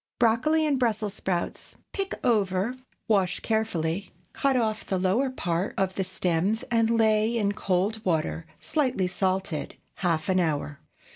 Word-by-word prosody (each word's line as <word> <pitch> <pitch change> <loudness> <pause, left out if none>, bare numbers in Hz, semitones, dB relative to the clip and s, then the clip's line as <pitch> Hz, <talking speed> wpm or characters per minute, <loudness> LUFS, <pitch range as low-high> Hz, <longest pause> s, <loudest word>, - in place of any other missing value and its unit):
BROCCOLI 255 +8 +3
AND 285 -3 +1
BRUSSELS 215 -4 0
SPROUTS. 180 -4 -3 0.2
Pick 390 -1 -2
over, 205 0 +2 0.3
wash 195 -5 +2
carefully, 200 -5 -1 0.2
cut 275 -1 +1
off 220 -2 0
the 190 - -1
lower 195 +9 +2
part 180 -7 -2
of 190 -1 +1
the 190 - -1
stems 185 +3 0
and 230 -1 +3
lay 220 0 +3
in 205 -3 +2
cold 205 +2 0
water, 165 -2 -1
slightly 260 -11 0
salted, 185 -3 -1 0.2
half 165 -4 0
an 185 -1 +3
hour. 150 -4 -1
200 Hz, 140 wpm, -27 LUFS, 185-230 Hz, 0.3 s, BROCCOLI